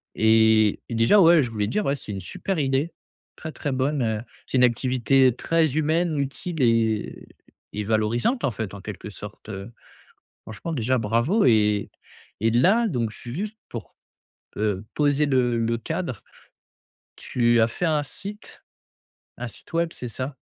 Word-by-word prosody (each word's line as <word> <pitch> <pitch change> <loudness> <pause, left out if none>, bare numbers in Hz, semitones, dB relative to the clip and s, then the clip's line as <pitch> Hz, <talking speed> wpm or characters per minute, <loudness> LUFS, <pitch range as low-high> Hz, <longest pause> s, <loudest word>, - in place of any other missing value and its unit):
et 110 -1 +4
et 115 - -4
déjà, 115 - +5
ouais, 165 -3 +6
je 115 - -4
voulais 105 -2 -1
te - - -4
dire, 210 +1 0
ouais, 140 - +1
c'est 105 - -7
une 95 - -5
super 185 - -4
idée, 140 +3 0 0.4
très, 160 - -7
très 145 - -4
bonne, 135 +2 0
heu, 110 -2 -1 0.3
c'est 130 - -1
une 125 - +5
activité 130 +1 +3
très 160 -2 +1
humaine, 160 +1 +1
utile 140 +3 -3
et 115 -3 +1 0.5
et 105 - -3
valorisante, 115 - 0
en 130 - +1
fait, 105 -2 -5
en 100 - -8
quelque 105 +1 -7
sorte, 105 +1 -11
heu, 100 +2 -7 0.7
franchement, 110 +10 -6
déjà, 130 -1 +1
bravo 120 - +1
et 105 -3 +3 0.5
et 115 +1 +2
là, 200 - +4
donc, 120 - -1
je - - -13
suis 120 +1 -8
juste, 210 +5 -4
pour, 115 - -8 0.6
heu, 105 -1 -1
poser 145 0 +2
le 125 -3 +2
le 115 0 0
cadre. 160 - -4 1.1
Tu 120 -1 +3
as 110 - +4
fait 175 +10 -2
un 155 -2 +2
site 200 +8 -9 0.8
un 125 0 -4
site - - -14
web, 170 0 +1
c'est 125 - -7
ça 130 +4 -5
125 Hz, 170 wpm, -24 LUFS, 110-155 Hz, 1.1 s, ouais